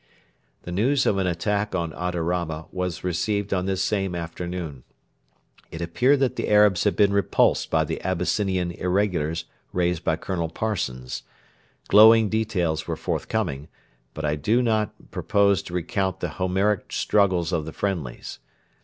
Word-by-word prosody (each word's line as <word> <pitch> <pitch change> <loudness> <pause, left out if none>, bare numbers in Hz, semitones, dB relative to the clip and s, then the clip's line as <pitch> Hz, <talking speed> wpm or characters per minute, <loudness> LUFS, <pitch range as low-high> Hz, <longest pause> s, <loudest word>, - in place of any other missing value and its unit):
The 85 - -7
news 130 +9 +2
of 100 - +2
an 95 - +1
attack 100 +4 -1
on 85 -3 -1
Adarama 85 -2 -2
was 90 -2 -3
received 100 +3 -1
on 90 0 -1
this 95 -1 0
same 95 -3 -1
afternoon. 85 -3 -5 0.9
It 80 - -8
appeared 125 +12 +2
that 135 - +1
the - - -2
Arabs 105 -3 +4
had 105 - +2
been 100 -1 +3
repulsed 100 -3 +2
by - - +2
the - - -4
Abyssinian 95 0 0
irregulars 90 -3 -1 0.3
raised 90 -2 0
by - - +1
Colonel 85 -3 -3
Parsons. 80 - -3 0.7
Glowing 110 +1 +7
details 90 -8 -1
were - - -2
forthcoming, 70 +3 -2 0.5
but 80 - -4
I 75 0 +1
do 110 - +2
not 110 -2 -1
propose 100 -3 +2
to 85 - -10
recount 95 +1 -1
the 90 - -2
Homeric 95 +5 0
struggles 95 -4 +1
of 80 -3 0
the 80 - -6
'friendlies.' 80 -11 -4
90 Hz, 145 wpm, -24 LUFS, 85-105 Hz, 0.9 s, Glowing